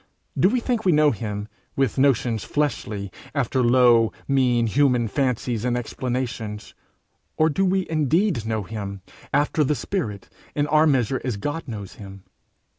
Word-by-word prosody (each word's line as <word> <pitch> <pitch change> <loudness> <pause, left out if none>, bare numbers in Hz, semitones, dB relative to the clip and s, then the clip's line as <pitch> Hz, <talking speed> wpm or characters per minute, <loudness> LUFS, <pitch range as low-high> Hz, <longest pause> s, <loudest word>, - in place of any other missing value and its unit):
Do 145 +7 +4
we 250 +3 +1
think 235 -2 -1
we 185 - +4
know 150 -1 +5
him 105 -1 -4 0.3
with 135 -1 0
notions 125 -5 +2
fleshly, 105 -9 -2 0.2
after 130 -2 +1
low, 120 -2 +5 0.2
mean 125 -4 +2
human 125 0 +2
fancies 125 -3 -1
and 125 -1 0
explanations, 120 -3 -4 0.6
or 155 0 +3
do 190 +7 0
we 190 0 +1
indeed 160 - +1
know 110 -2 -1
him 100 -2 -6 0.3
after 145 +2 +2
the 150 +2 +1
spirit, 130 - -4 0.3
in 145 - +1
our 155 +1 +4
measure 130 -2 +1
as 125 -5 -2
God 145 +9 -4
knows 105 -5 -7
him? 100 -1 -10
125 Hz, 150 wpm, -23 LUFS, 110-150 Hz, 0.6 s, know